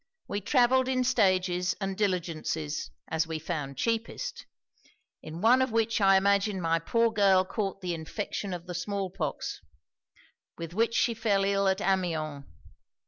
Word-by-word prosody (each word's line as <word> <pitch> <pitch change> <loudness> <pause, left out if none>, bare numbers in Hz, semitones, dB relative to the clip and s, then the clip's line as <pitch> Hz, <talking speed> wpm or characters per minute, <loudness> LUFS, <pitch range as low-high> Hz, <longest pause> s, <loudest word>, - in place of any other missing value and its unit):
We 205 - -3
travelled 255 +3 +3
in 255 -1 +1
stages 185 -7 +2
and 195 -1 -2
diligences, 165 -6 -2 0.2
as 160 0 0
we 160 -1 -3
found 150 -4 -4
cheapest; 230 - -3 0.7
in 160 +2 -8
one 245 +4 +5
of 260 -2 +1
which 225 0 +1
I 195 -1 +6
imagine 200 0 +2
my 165 -1 +1
poor 230 +7 +1
girl 195 -3 +4
caught 195 0 -3
the 180 -2 -2
infection 195 +4 -4
of 175 -1 -5
the 180 - -6
small 195 +1 -3
pox, - - -4 1.0
with 165 0 -7
which 230 +3 +1
she 235 - +2
fell 215 -4 +1
ill 200 0 +2
at 190 +1 +1
Amiens. 160 -7 -1
195 Hz, 150 wpm, -28 LUFS, 170-220 Hz, 1.0 s, I